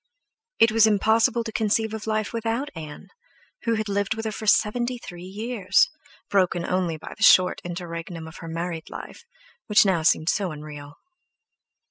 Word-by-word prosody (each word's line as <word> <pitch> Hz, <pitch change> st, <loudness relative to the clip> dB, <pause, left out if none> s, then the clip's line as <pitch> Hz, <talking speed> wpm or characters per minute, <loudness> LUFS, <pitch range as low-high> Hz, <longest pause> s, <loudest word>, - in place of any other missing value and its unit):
It 225 Hz, -, +5 dB
was 220 Hz, 0 st, +5 dB
impossible 225 Hz, +3 st, +3 dB
to 225 Hz, -, -6 dB
conceive 220 Hz, 0 st, 0 dB
of 220 Hz, 0 st, -6 dB
life 215 Hz, 0 st, -1 dB
without 230 Hz, +5 st, -2 dB
Ann, 155 Hz, -2 st, -9 dB, 0.6 s
who 230 Hz, -1 st, +2 dB
had 220 Hz, 0 st, -2 dB
lived 200 Hz, +1 st, -1 dB
with 225 Hz, 0 st, -5 dB
her 220 Hz, -, -1 dB
for 215 Hz, 0 st, -7 dB
seventy 240 Hz, +4 st, +2 dB
three 175 Hz, -7 st, -10 dB
years, 195 Hz, 0 st, +1 dB, 0.4 s
broken 185 Hz, -4 st, +1 dB
only 180 Hz, -3 st, -1 dB
by 155 Hz, -, -9 dB
the -, -, -17 dB
short 185 Hz, -2 st, +6 dB
interregnum 170 Hz, -1 st, -6 dB
of 160 Hz, -, -11 dB
her 165 Hz, -, -9 dB
married 165 Hz, 0 st, -4 dB
life, -, -, -9 dB, 0.4 s
which 210 Hz, -1 st, +6 dB
seemed 195 Hz, -2 st, +3 dB, 0.2 s
now 155 Hz, -, -9 dB
so 185 Hz, +2 st, 0 dB
unreal. 145 Hz, -1 st, -9 dB
200 Hz, 165 wpm, -24 LUFS, 170-220 Hz, 0.6 s, short